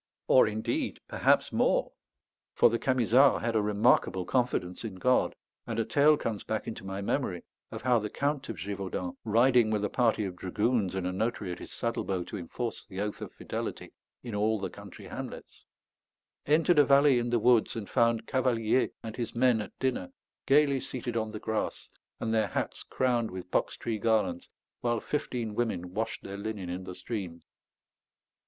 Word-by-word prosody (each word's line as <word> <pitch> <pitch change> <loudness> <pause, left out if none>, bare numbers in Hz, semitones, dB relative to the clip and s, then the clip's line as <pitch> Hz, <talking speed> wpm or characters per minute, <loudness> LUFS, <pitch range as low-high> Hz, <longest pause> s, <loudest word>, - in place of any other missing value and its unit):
Or - - +6
indeed, 110 +1 -2
perhaps - - +2
more; - - +2 0.6
for 120 - +5
the 115 - 0
Camisards 130 +1 +4
had 115 -1 0
a 110 - +4
remarkable 105 -3 +2
confidence 120 -8 -1
in 110 -4 -5
God; 125 +7 +2 0.3
and 115 -2 -3
a 115 - +1
tale 150 +1 +4
comes 110 -6 -3
back 110 -1 -3
into 110 - -6
my 95 +1 -4
memory 100 -6 -1 0.3
of - - -8
how 125 -2 +4
the 105 0 -4
Count 140 +2 -2
of 115 - -3
Gévaudan, 100 - -4
riding 120 +1 +4
with 105 -1 0
a - - -3
party 115 -4 +2
of 95 -2 -5
dragoons 100 +1 0
and 95 -1 -2
a 90 - 0
notary 105 -1 -2
at 90 - -6
his - - -9
saddlebow 100 -6 -2
to 105 - -7
enforce 115 +7 -4
the 95 - -8
oath 105 0 -3
of - - -6
fidelity - - -5 0.3
in 120 -3 -6
all 110 +2 +1
the 100 - -4
country - - -11
hamlets, - - -8 0.8
entered 160 +2 +4
a - - +9
valley 140 -2 +5
in 120 0 -2
the 120 - +2
woods, 120 0 +3
and 110 -3 -5
found 115 -2 +2
Cavalier 125 -2 +1
and 110 0 -6
his 120 -2 -4
men 120 -2 +3
at - - -9
dinner, 125 -9 -1 0.4
gaily 140 -1 +4
seated 120 -2 -5
on 110 -1 -1
the 105 0 -6
grass, 110 0 -3 0.3
and 110 - -1
their 110 -2 +2
hats - - -3
crowned 120 -3 0
with 90 -1 -8
box - - 0
tree 115 -2 -3
garlands, 110 -5 0 0.3
while 120 -1 0
fifteen 120 -6 -3
women 90 -6 -2
washed 110 +3 -3
their 100 0 -6
linen 100 -3 -4
in 90 +1 -5
the 90 - -7
stream. 90 -3 -5
110 Hz, 180 wpm, -29 LUFS, 100-125 Hz, 0.8 s, a